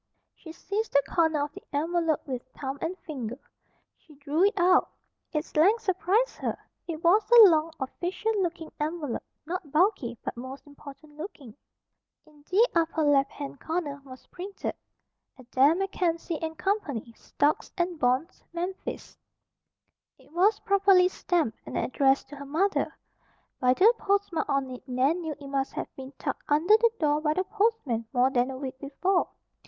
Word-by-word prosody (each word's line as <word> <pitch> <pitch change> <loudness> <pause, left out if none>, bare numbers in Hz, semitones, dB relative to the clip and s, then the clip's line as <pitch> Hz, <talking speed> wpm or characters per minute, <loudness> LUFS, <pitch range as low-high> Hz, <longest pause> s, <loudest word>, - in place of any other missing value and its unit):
She 325 - -12
seized 405 +6 -4
the 280 0 +5
corner 320 -3 +2
of 295 0 -5
the - - -10
envelope 325 +1 0
with 255 -3 -4 0.2
thumb 275 0 -4
and 350 +3 -3
finger. 255 -9 -6 0.6
She 305 - -19
drew 290 +4 0
it 405 - +1
out. 360 +1 +4 0.4
Its 305 0 -4
length 405 +9 +4
surprised 390 +5 +1
her. - - -3 0.3
It 330 -1 -5
was 410 +5 +4
a 475 -1 +10
long, 320 -1 +2
official 355 +10 -2
looking 335 -3 -3
envelope, 300 -4 -2 0.2
not 335 -3 -5
bulky 305 - +2
but - - -4
most 260 +3 -8
important 290 +1 -13
looking. 290 - -9 0.7
In 300 -1 -21
the 435 +6 +5
upper 325 -1 +1
left 280 -2 +4
hand 280 -1 -7
corner 310 -4 -3
was 260 -2 -13
printed: 390 +2 -6 0.6
ADAIR 260 +4 +3
MACKENZIE 345 -3 -1
& 320 - -16
CO. 395 +1 +2 0.4
STOCKS 290 +5 -1
AND 345 -2 -1
BONDS 255 +8 0
MEMPHIS 360 +3 -5 1.0
It - - -22
was 390 +6 +3
properly 390 -2 +4
stamped 335 - -1
and - - -5
addressed 270 +1 +2
to 290 - -9
her 280 - -8
mother. 370 +8 0 0.6
By 250 0 +3
the 430 - +6
postmark 395 -5 0
on 275 -2 0
it 255 +1 -10
Nan 270 +8 +1
knew 320 -3 -4
it 285 - -10
must 275 -1 -2
have - - -6
been 265 0 -9
tucked - - -3
under 320 +8 +5
the 465 +1 +4
door 300 -1 +2
by 305 -1 +1
the 375 - +1
postman 395 - 0
more 255 +1 +3
than 250 0 +1
a 265 - -5
week 260 -1 -6
before. 355 +7 0
315 Hz, 160 wpm, -27 LUFS, 275-365 Hz, 1.0 s, a